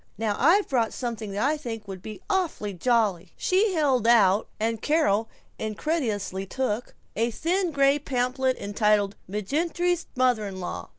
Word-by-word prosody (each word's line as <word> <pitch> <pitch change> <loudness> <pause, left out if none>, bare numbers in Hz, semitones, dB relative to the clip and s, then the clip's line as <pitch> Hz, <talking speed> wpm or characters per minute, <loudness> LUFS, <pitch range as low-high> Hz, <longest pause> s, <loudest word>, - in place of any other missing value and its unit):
Now 215 -2 0
I've 355 +9 +4
brought 235 -4 0
something 230 -4 -4
that 205 +5 0
I 305 +1 +1
think 225 -7 -6
would 190 -2 -7
be 215 +1 -8
awfully 355 - -1
jolly." 195 -4 +1
She 385 +1 +2
held 265 -7 +2
out, 210 -3 +5
and 225 0 -1
Carol 225 -9 +2 0.3
incredulously 215 - -2
took, 245 0 -3 0.2
a 230 +3 +1
thin 350 - 0
gray 280 -1 +3
pamphlet 260 -1 0
entitled 205 0 +1
"McGinerty's 330 - -1
Mother 250 -5 +2
in 190 -1 -7
law." 180 - -5
235 Hz, 145 wpm, -26 LUFS, 210-290 Hz, 0.3 s, out